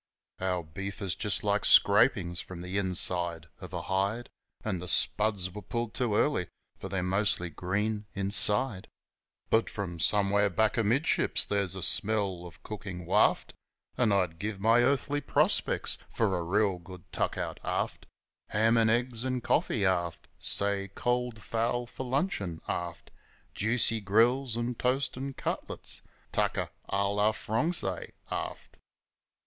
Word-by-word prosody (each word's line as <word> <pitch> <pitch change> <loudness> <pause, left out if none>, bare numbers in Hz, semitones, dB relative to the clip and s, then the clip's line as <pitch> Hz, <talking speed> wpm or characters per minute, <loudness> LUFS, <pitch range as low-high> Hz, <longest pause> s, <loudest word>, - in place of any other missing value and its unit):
Our 90 -2 -1
beef 100 +6 -7
is 95 -3 -2
just 95 0 -1
like 105 0 +1
scrapin's 100 -5 +5
from 90 -1 -9
the 90 +2 -5
inside 90 -4 0
of - - -9
a - - -4
hide, 100 +5 -1 0.3
And 95 -5 -2
the 90 - -6
spuds 100 -1 +3
were 105 - -7
pulled 115 +3 -4
too 120 -5 0
early, 105 - +1 0.3
for 95 - -6
they're 95 -1 -2
mostly 95 -2 0
green 105 +5 -2
inside; 100 +2 +4 0.6
But 110 +1 +3
from 90 -5 -5
somewhere 100 +2 +2
back 110 +3 +1
amidships 120 +7 +2
there's 100 -3 -1
a 95 - -4
smell 100 -5 0
o' - - -11
cookin' 95 -4 -7
waft, - - +2 0.4
An' 120 -4 +2
I'd 90 -5 0
give 105 0 -4
my 115 +4 +4
earthly 140 +3 +1
prospects - - +1
for 105 -5 0
a 90 - -1
real 95 +2 +1
good 90 0 -12
tuck - - -1
out - - -4
aft - - -3 0.4
Ham 115 +2 +2
an' 115 -1 +4
eggs, 120 0 0
'n' 130 -1 -2
coffee, 105 -2 +1
aft, 85 -3 -1
Say, 100 -1 +2
cold 120 -2 -1
fowl 120 +2 -1
for 130 +2 -7
luncheon, 125 - -1
aft, 85 -1 -5 0.4
Juicy 115 +1 +1
grills 115 +5 +2
an' 120 +1 -1
toast 130 +3 0
'n' 135 +1 -5
cutlets - - -4 0.3
tucker - - 0 0.2
a 100 0 +1
lor 105 +2 +2
frongsy, 110 - -1 0.2
aft. - - -5
100 Hz, 145 wpm, -29 LUFS, 95-115 Hz, 0.6 s, scrapin's